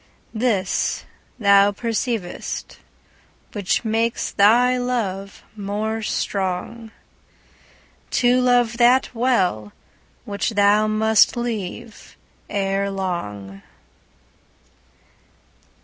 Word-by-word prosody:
This 215 Hz, -5 st, -1 dB, 0.3 s
thou 200 Hz, -2 st, +5 dB
perceiv'st, 225 Hz, -2 st, -4 dB, 0.7 s
which 205 Hz, +2 st, -1 dB
makes 225 Hz, +1 st, -1 dB
thy 240 Hz, +5 st, +4 dB
love 215 Hz, -6 st, -3 dB
more 215 Hz, +2 st, -3 dB
strong, 200 Hz, +2 st, -3 dB, 1.2 s
To 250 Hz, +1 st, +3 dB
love 245 Hz, -2 st, +2 dB
that 250 Hz, +2 st, +4 dB
well, 190 Hz, -, 0 dB, 0.5 s
which 205 Hz, +2 st, -3 dB
thou 205 Hz, +1 st, +4 dB
must 220 Hz, +1 st, +3 dB
leave 230 Hz, -1 st, -6 dB, 0.3 s
ere 195 Hz, -1 st, -1 dB
long. 105 Hz, -, -5 dB
215 Hz, 70 wpm, -21 LUFS, 195-235 Hz, 1.2 s, thou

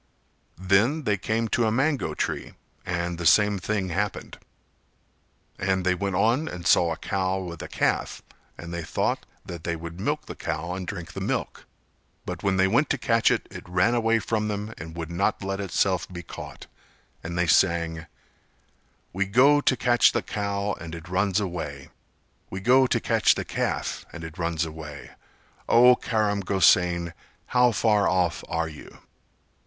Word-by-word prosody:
Then 100 Hz, -, +2 dB
they 105 Hz, -5 st, +1 dB
came 110 Hz, +3 st, -1 dB
to 115 Hz, 0 st, +2 dB
a -, -, +1 dB
mango 135 Hz, +5 st, 0 dB
tree -, -, -3 dB, 0.3 s
and 85 Hz, -1 st, -2 dB
the 85 Hz, -, -4 dB
same 105 Hz, +3 st, +4 dB
thing 95 Hz, +1 st, -2 dB
happened. 95 Hz, +3 st, -3 dB, 1.2 s
And 95 Hz, -1 st, 0 dB
they 90 Hz, -, +3 dB
went 100 Hz, +1 st, -2 dB
on 115 Hz, -, +2 dB
and 85 Hz, -, -7 dB
saw 85 Hz, -2 st, +4 dB
a 80 Hz, -, -3 dB
cow 95 Hz, 0 st, -1 dB
with 85 Hz, -3 st, -6 dB
a -, -, -6 dB
calf; -, -, -1 dB, 0.3 s
and 85 Hz, 0 st, -8 dB
they 85 Hz, -, -3 dB
thought 80 Hz, -, -2 dB, 0.2 s
that 85 Hz, -2 st, -8 dB
they 85 Hz, 0 st, -2 dB
would 85 Hz, +1 st, -8 dB
milk -, -, -2 dB
the -, -, -7 dB
cow 85 Hz, +3 st, -4 dB
and 90 Hz, -1 st, -5 dB
drink 85 Hz, 0 st, -6 dB
the -, -, -6 dB
milk, -, -, -3 dB, 0.6 s
but 90 Hz, -1 st, -5 dB
when 95 Hz, -2 st, +1 dB
they 95 Hz, 0 st, +4 dB
went 120 Hz, +10 st, +2 dB
to 145 Hz, -, +1 dB
catch 115 Hz, -2 st, +2 dB
it -, -, 0 dB
it -, -, -10 dB
ran 90 Hz, +6 st, +2 dB
away 115 Hz, -1 st, +2 dB
from 110 Hz, 0 st, -1 dB
them 105 Hz, +1 st, -4 dB
and 80 Hz, +1 st, -8 dB
would 85 Hz, -1 st, -5 dB
not 100 Hz, +4 st, 0 dB
let 95 Hz, 0 st, -3 dB
itself 95 Hz, -1 st, 0 dB
be 85 Hz, -1 st, -7 dB
caught; -, -, -9 dB, 0.6 s
and 85 Hz, +1 st, -5 dB
they 90 Hz, -, +2 dB
sang: 85 Hz, -2 st, +2 dB, 1.1 s
"We 100 Hz, +2 st, 0 dB
go 135 Hz, +8 st, +5 dB
to 130 Hz, -, +2 dB
catch 120 Hz, -1 st, +4 dB
the 120 Hz, -, 0 dB
cow 100 Hz, 0 st, -2 dB
and 85 Hz, -1 st, -7 dB
it 85 Hz, +1 st, -10 dB
runs 95 Hz, +2 st, +1 dB
away, 85 Hz, -8 st, -5 dB, 0.6 s
We 95 Hz, -, -5 dB
go 130 Hz, +5 st, +4 dB
to -, -, +1 dB
catch -, -, +3 dB
the -, -, -4 dB
calf -, -, -2 dB
and 85 Hz, -, -9 dB
it 80 Hz, +1 st, -9 dB
runs 85 Hz, -1 st, 0 dB
away, 75 Hz, -2 st, -9 dB, 0.6 s
O 125 Hz, +2 st, +7 dB
Karam 110 Hz, -4 st, 0 dB
Gosain 90 Hz, -3 st, +3 dB, 0.3 s
how 125 Hz, -1 st, +3 dB
far 105 Hz, -2 st, +2 dB
off 90 Hz, -3 st, 0 dB
are 80 Hz, 0 st, -1 dB
you?" 75 Hz, -2 st, -12 dB
95 Hz, 175 wpm, -25 LUFS, 85-110 Hz, 1.2 s, O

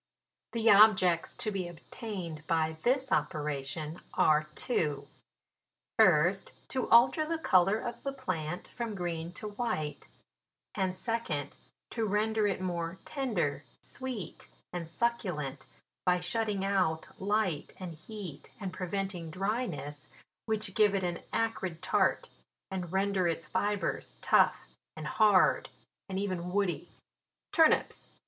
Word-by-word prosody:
" -, -, -60 dB
The 230 Hz, -1 st, 0 dB
objects 190 Hz, -5 st, +6 dB
to 215 Hz, -, -1 dB
be 190 Hz, -3 st, -2 dB
attained 175 Hz, -2 st, -7 dB
by 160 Hz, -1 st, +1 dB
this 265 Hz, +1 st, +1 dB
ope* -, -, +2 dB
ration 150 Hz, +2 st, -4 dB
are 155 Hz, 0 st, +4 dB
two: 145 Hz, -, -1 dB, 0.4 s
— -, -, -40 dB
first, 175 Hz, +6 st, +4 dB, 0.2 s
to 260 Hz, -2 st, -2 dB
alter 255 Hz, +7 st, +6 dB
the 325 Hz, +1 st, -1 dB
colour 195 Hz, -, +4 dB
of 240 Hz, +1 st, -5 dB
the 275 Hz, -, -2 dB
plant 180 Hz, -, -4 dB
from 230 Hz, -3 st, -4 dB
green 170 Hz, -2 st, -3 dB
to 210 Hz, +3 st, -6 dB
white; 205 Hz, -, -3 dB, 0.7 s
and 185 Hz, -2 st, -1 dB
second, 225 Hz, -, -2 dB, 0.4 s
to 225 Hz, -2 st, -1 dB
render 215 Hz, +1 st, +2 dB
it 195 Hz, -, -1 dB
more 175 Hz, -1 st, -3 dB
tender, 205 Hz, -, -1 dB, 0.2 s
sweet 245 Hz, -10 st, -6 dB, 0.3 s
and 170 Hz, -2 st, -4 dB
succulent, 175 Hz, -, -2 dB, 0.4 s
by 180 Hz, -1 st, +3 dB
shutting 200 Hz, +1 st, -1 dB
out 185 Hz, -5 st, +1 dB
light 195 Hz, -6 st, 0 dB
and 180 Hz, -3 st, -5 dB
heat, 175 Hz, -1 st, -9 dB
and 190 Hz, -3 st, -4 dB
prevent 195 Hz, +1 st, -2 dB
ing 170 Hz, -2 st, -6 dB
dryness, 175 Hz, -, -3 dB, 0.4 s
which 220 Hz, -1 st, -1 dB
give 210 Hz, -2 st, +4 dB
it 190 Hz, -, 0 dB
an 175 Hz, -1 st, -1 dB
acrid 190 Hz, -7 st, -1 dB
tart, 185 Hz, -, +2 dB, 0.4 s
and 180 Hz, -3 st, -4 dB
render 190 Hz, -1 st, +2 dB
its 165 Hz, -1 st, -2 dB
fibres 205 Hz, +5 st, -1 dB
tough -, -, +4 dB, 0.3 s
and 155 Hz, -, -6 dB
hard, 205 Hz, +3 st, +4 dB, 0.4 s
and 190 Hz, -, -3 dB
even 185 Hz, -3 st, -2 dB
woody." 200 Hz, -2 st, 0 dB, 0.6 s
TURNIPS. 320 Hz, -1 st, +3 dB
190 Hz, 130 wpm, -31 LUFS, 165-215 Hz, 0.7 s, objects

